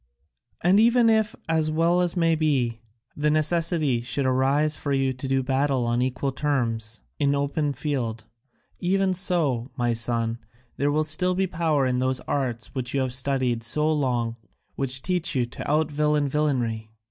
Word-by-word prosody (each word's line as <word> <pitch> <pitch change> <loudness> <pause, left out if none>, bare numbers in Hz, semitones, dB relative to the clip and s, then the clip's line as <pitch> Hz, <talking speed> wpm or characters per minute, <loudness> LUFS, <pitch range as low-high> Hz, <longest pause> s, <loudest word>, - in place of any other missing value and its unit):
And 185 +4 +4
even 235 0 +5
if, 220 -1 +1
as 160 -1 +1
well 170 +3 +2
may 165 -2 +2
be, 135 -7 0 0.4
the 150 +1 +1
necessity 155 -4 +1
should 130 +3 -2
arise 135 +4 +2
for 145 - -4
you 135 -1 +1
to 130 +2 -6
do 135 0 +1
battle 135 -1 0
on 120 +1 0
equal 130 +2 -1
terms 115 - -2 0.2
in 140 0 +2
open 145 +1 -1
field, 120 -6 -3 0.5
even 190 +1 +1
so, 160 -10 +1
my 120 -1 +1
son, 115 0 0 0.4
there 145 +2 +1
will 155 +1 +1
still 180 +4 +1
be 190 +1 +1
power 160 -5 0
in 125 -1 0
those 130 0 0
arts 120 -5 -3
which 130 -1 -4
you 135 - +2
have 130 -2 -2
studied 130 -3 0
so 150 +7 +1
long 125 -6 0
and 115 - -9 0.4
which 130 -1 +1
teach 180 -4 -1
you 125 -2 +2
to 120 - -7
out 155 +1 +1
villain 150 0 +1
villainy. 125 -7 -1
140 Hz, 170 wpm, -25 LUFS, 125-155 Hz, 0.5 s, even